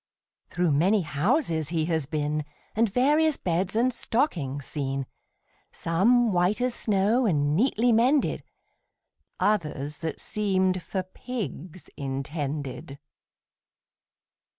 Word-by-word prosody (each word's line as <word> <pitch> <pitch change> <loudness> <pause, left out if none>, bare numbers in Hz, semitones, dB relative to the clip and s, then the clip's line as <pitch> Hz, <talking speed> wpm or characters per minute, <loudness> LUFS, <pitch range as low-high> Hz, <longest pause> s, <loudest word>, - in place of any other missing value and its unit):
Through 175 -2 +1
many 185 +9 +3
houses 165 - 0
he 160 -2 0
has 160 -4 -1
been, 150 0 -1 0.3
And 225 -1 +2
various 295 +6 +3
beds 180 +3 -1
and 245 +3 +2
stockings 155 - -1
seen; 135 -2 -2 0.7
Some, 225 +8 +2
white 180 +5 +2
as 250 0 0
snow, 215 +3 +2
and 145 -4 +1
neatly 240 +3 +2
mended, 250 +5 +3 1.0
Others, 150 -8 -1
that 160 -2 -4
seemed 190 -4 0
for 190 +2 -3
pigs 185 - -7
intended. 140 +1 -4
180 Hz, 105 wpm, -26 LUFS, 150-225 Hz, 1.0 s, many